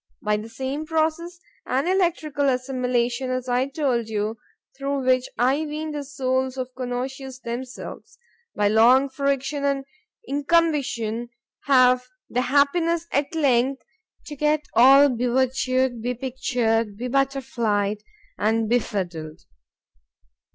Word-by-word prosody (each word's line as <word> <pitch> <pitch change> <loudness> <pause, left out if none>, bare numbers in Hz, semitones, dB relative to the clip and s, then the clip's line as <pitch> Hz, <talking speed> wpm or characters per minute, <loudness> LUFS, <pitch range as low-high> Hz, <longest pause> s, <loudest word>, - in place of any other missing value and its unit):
—by 210 0 +2
the 215 +2 -5
same 265 +5 -4
process 320 +2 -1 0.3
and 270 +6 0
electrical 320 -6 +1
assimilation, 250 -1 -1
as 255 0 -2
I 250 +2 +1
told 265 -6 -1
you, 215 +1 -2 0.4
through 275 -1 -2
which 255 0 +2
I 255 +4 +3
ween 310 +1 -4
the 295 -1 -4
souls 260 -1 -1
of 255 0 -4
connoisseurs 260 +1 -5
themselves, 245 +2 -7 0.4
by 205 - +2
long 240 +6 +5
friction 280 +1 -1
and 275 -1 0 0.4
incumbition, 280 -7 0 0.4
have 255 -2 +4 0.2
the 250 - +1
happiness, 320 +6 +2
at 285 +3 -1
length, 265 -3 +2 0.4
to 295 - -7
get 300 +1 +1
all 270 +4 +7
be 250 -2 -1
virtu'd—be 255 -1 0
pictured,—be 235 -3 -1
butterflied, 235 -7 0 0.4
and 220 +1 +1
be 245 +3 +3
fiddled. 170 -8 -5
260 Hz, 115 wpm, -24 LUFS, 240-280 Hz, 0.4 s, all